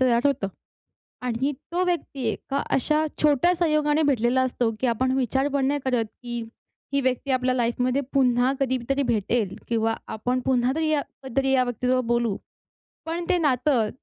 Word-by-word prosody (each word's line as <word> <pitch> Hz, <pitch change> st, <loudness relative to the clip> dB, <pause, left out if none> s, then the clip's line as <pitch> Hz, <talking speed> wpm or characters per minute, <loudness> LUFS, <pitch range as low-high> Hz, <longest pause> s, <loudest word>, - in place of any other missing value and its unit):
तयार 250 Hz, +1 st, +3 dB
होतं 245 Hz, -8 st, 0 dB, 0.8 s
आणि 255 Hz, +5 st, 0 dB, 0.2 s
तो 360 Hz, +1 st, +1 dB
व्यक्ती 340 Hz, -6 st, -2 dB
एका 275 Hz, +5 st, -3 dB
अशा 305 Hz, +3 st, +2 dB, 0.2 s
छोट्या 300 Hz, +4 st, +4 dB
संयोगाने 305 Hz, -2 st, +2 dB
भेटलेला 250 Hz, -1 st, +2 dB
असतो, 245 Hz, -2 st, 0 dB
की 260 Hz, -, +1 dB
आपण 255 Hz, +2 st, +1 dB
विचार 265 Hz, +2 st, +1 dB
पण 270 Hz, -1 st, +2 dB
नाही 285 Hz, +1 st, 0 dB
करत, 245 Hz, -3 st, +1 dB, 0.2 s
की 240 Hz, -1 st, -4 dB, 0.5 s
ही 280 Hz, -, +2 dB
व्यक्ती 260 Hz, +1 st, -1 dB
आपल्या 255 Hz, 0 st, +2 dB
लाईफमध्ये 250 Hz, +2 st, +1 dB
पुन्हा 255 Hz, -1 st, +3 dB
कधीतरी 265 Hz, +1 st, 0 dB
भेटेल 225 Hz, -3 st, 0 dB
किंवा 225 Hz, -1 st, +1 dB, 0.2 s
आपण 250 Hz, +4 st, -1 dB
पुन्हा 250 Hz, -1 st, +2 dB
तरी 320 Hz, -1 st, +1 dB
या 300 Hz, -2 st, +2 dB, 0.2 s
कधीतरी 270 Hz, +1 st, 0 dB
या 255 Hz, -1 st, +4 dB
व्यक्तीसोबत 250 Hz, +1 st, 0 dB
बोलू. 235 Hz, -4 st, +1 dB, 0.7 s
पण 340 Hz, +1 st, -3 dB
ते 365 Hz, -, +4 dB
नातं 260 Hz, -7 st, +2 dB
260 Hz, 160 wpm, -25 LUFS, 240-280 Hz, 0.8 s, छोट्या